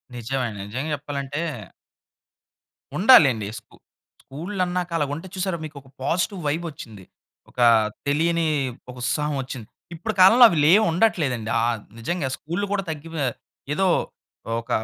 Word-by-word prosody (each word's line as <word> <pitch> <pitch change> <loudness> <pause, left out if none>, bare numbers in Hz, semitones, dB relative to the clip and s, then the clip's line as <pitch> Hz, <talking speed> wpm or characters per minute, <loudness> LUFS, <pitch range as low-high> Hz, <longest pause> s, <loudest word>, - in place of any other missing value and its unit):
నిజమే 125 +3 -2
అండి. 105 -2 -9
నిజంగా 130 +8 -4
జెప్పాలంటే 145 +1 -5 1.6
ఉండాలండి. 140 - +6
స్కు - - -23 0.5
స్కూల్ 175 +9 -7
అన్నాక 180 0 -2
అలా 150 - +1
ఉంటే 165 +6 -6
చూసారా! 185 -1 -2
మీకు 150 -1 -10
ఒక 135 - -22
పాజిటివ్ 180 +6 -1
వైబ్ 160 +4 -1
వచ్చింది. 110 -8 -11 0.5
ఒక - - -13 0.5
తెలియని 165 +3 +1 0.4
ఒక 125 - -8
ఉత్సాహం 150 +3 -1
వచ్చింది. 125 -4 -8 0.3
ఇప్పుడు 195 +7 -4
కాలంలో 225 +7 +9
అవి 170 - -1
లేవు 195 +8 +6
ఉండట్లేదండి. 150 - +1
ఆహ్, 115 -1 0 0.2
నిజంగా 150 +5 -2
స్కూల్‌లు 175 +7 -3
కూడా 200 -1 0
తగ్గిపో 160 0 -5 0.5
ఏదో 190 +5 +1 0.8
ఒక 115 - -24
155 Hz, 135 wpm, -23 LUFS, 135-180 Hz, 1.6 s, కాలంలో